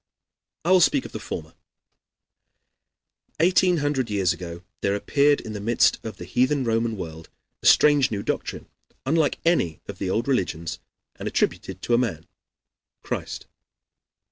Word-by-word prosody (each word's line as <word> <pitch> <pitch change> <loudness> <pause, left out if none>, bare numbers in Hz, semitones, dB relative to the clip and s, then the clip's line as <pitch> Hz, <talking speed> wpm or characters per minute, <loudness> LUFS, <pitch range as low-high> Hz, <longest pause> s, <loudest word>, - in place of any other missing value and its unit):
I 175 - +2
will 185 -1 +6
speak - - +4
first - - -8
of - - -21
the - - -6
former. 80 0 -6 1.9
Eighteen 180 +1 +4
hundred 135 -5 0
years 95 -4 +2
ago 85 -1 -8 0.2
there 100 0 +1
appeared 145 +7 +3
in 110 - -7
the 105 - -5
midst 115 +3 +3
of 110 -3 -7
the - - -8
heathen 130 +2 +1
Roman 115 -1 0
world 80 -3 -8 0.3
a - - +1
strange 145 -3 +6
new 100 -2 -3
doctrine, - - -3 0.4
unlike 155 +2 +2
any 165 - +2
of 100 -1 -8
the 95 - -2
old 115 +6 0
religions, 85 - -1 0.4
and - - -5
attributed 95 -1 -1
to 120 - 0
a 120 - +5
man, 85 -10 -2 0.8
Christ. - - -4
115 Hz, 155 wpm, -24 LUFS, 95-145 Hz, 1.9 s, will